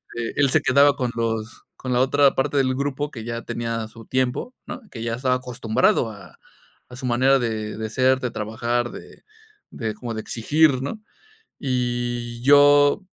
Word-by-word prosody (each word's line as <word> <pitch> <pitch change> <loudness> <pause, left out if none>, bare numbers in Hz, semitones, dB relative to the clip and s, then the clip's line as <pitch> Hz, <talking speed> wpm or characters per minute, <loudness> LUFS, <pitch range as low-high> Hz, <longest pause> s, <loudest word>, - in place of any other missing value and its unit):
este, 120 +3 -4
él 140 - +4
se - - +3
quedaba 140 +1 +4
con 125 -4 -2
los 115 -1 -3
con 130 -1 -4
la 125 - +3
otra 140 +1 +3
parte 140 +2 0
del 130 -1 +2
grupo 145 +1 -2
que 115 -6 -8
ya 115 0 -5
tenía 115 -1 -3
su 115 +1 -14
tiempo, 130 - -1
¿no?, 255 - -7
que 115 - -8
ya 115 0 -2
estaba 125 +1 +1
acostumbrado 120 -2 +1
a 100 -2 -14 0.5
a 125 - -10
su 130 +1 -7
manera 130 +3 +3
de 110 -3 -3
de 110 0 -4
ser, 130 +3 +2
de 125 -3 -3
trabajar, 115 +3 -2
de - - -12 0.5
de 110 -2 -4
como 115 +2 -6
de 110 - -4
exigir, 135 +4 +2
¿no? 140 +11 -4 0.6
Y 120 -2 -2
yo, 145 +4 +6
125 Hz, 180 wpm, -23 LUFS, 115-135 Hz, 0.6 s, yo